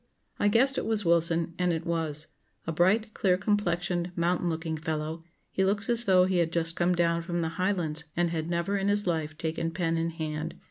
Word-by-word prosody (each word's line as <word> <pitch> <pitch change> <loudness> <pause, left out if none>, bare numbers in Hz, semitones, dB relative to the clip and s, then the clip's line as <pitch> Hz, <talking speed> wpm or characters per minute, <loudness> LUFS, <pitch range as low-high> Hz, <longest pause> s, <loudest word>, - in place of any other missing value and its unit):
I 205 - +3
guessed 260 +6 +3
it - - -4
was 215 -3 +1
Wilson; 170 0 +2
and 180 -1 +2
it 165 0 -3
was. 160 -3 -2 0.4
A 165 - -2
bright, 205 +7 +2
clear 180 -2 +2
complexioned, 180 -3 0
mountain 175 +1 0
looking 160 0 -3
fellow, 155 0 -4 0.3
he 190 - 0
looks 200 +3 +2
as 235 0 +2
though 185 -2 +5
he 185 -1 0
had 170 -2 +1
just 165 -1 +1
come 175 +1 +2
down 170 -1 +1
from 175 0 -2
the 160 - -1
Highlands 165 -3 -1
and 175 -1 +2
had 160 0 -3
never 170 +3 -1
in 195 0 0
his 205 0 +2
life 160 -3 -2
taken 165 +1 -2
pen 165 -1 -1
in 165 +1 0
hand. 160 -1 -4
170 Hz, 205 wpm, -28 LUFS, 165-185 Hz, 0.4 s, though